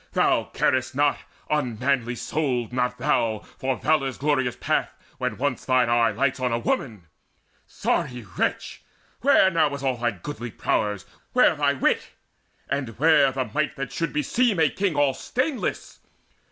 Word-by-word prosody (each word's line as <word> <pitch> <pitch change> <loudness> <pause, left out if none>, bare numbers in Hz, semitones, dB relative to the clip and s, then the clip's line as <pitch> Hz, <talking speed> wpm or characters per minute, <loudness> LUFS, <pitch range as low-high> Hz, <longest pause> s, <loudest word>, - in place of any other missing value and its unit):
Thou - - +2
carest 130 0 0
not, 145 +1 +2 0.3
unmanly 125 -3 0
souled, 125 -4 -2
not 125 0 0
thou, 115 -5 0 0.2
For 130 0 0
valour's 145 -4 +1
glorious 130 -3 0
path, - - -1 0.2
when - - -2
once 135 -1 -1
thine 130 -2 +2
eye 120 -1 +4
Lights 130 +5 0
on 125 -1 0
a 115 - +1
woman! 115 -3 -2 0.6
Sorry 125 -2 -2
wretch, - - -2 0.4
where 240 -7 +5
now 160 -4 +2
Is 140 - -8
all 130 -2 0
thy 120 0 +1
goodly 120 +4 -7
prowess? 105 -2 -1 0.3
where 250 -9 +5
thy 145 -1 +2
wit? 135 - 0 0.5
And 130 -5 -3
where 150 -1 +5
the 130 0 -2
might 155 +1 0
that 135 -2 -5
should 165 - -2
beseem 200 - +1
a 160 -2 +4
king 195 -5 -1
All 145 -2 +3
stainless? 260 - -3
135 Hz, 155 wpm, -24 LUFS, 120-150 Hz, 0.6 s, where